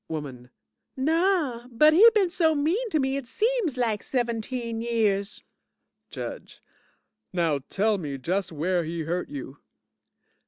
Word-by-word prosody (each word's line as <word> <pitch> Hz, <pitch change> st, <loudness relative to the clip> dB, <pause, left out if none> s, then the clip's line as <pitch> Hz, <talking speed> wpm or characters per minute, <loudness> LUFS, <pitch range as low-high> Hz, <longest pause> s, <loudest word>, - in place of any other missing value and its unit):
WOMAN 135 Hz, -6 st, -6 dB, 0.5 s
Naw, 310 Hz, -4 st, +1 dB
but 300 Hz, +6 st, +5 dB
he 425 Hz, +8 st, +9 dB
been 385 Hz, -5 st, +3 dB
so 325 Hz, -3 st, +2 dB
mean 345 Hz, +12 st, 0 dB
to 320 Hz, -, +1 dB
me, 270 Hz, -1 st, 0 dB
it 275 Hz, -3 st, -6 dB
seems 435 Hz, -, 0 dB
lak 225 Hz, -4 st, 0 dB
seventeen 235 Hz, -1 st, -2 dB
years. 215 Hz, -4 st, 0 dB, 0.7 s
JUDGE -, -, -7 dB, 0.7 s
Now 170 Hz, -4 st, +1 dB
you 140 Hz, -2 st, -2 dB
tell 210 Hz, +1 st, +1 dB
me 145 Hz, -5 st, -4 dB
just 180 Hz, +8 st, -2 dB
where 170 Hz, +3 st, 0 dB
he 165 Hz, +1 st, -4 dB
hurt 175 Hz, +3 st, -3 dB
you. 140 Hz, 0 st, -8 dB
230 Hz, 135 wpm, -26 LUFS, -, 0.7 s, he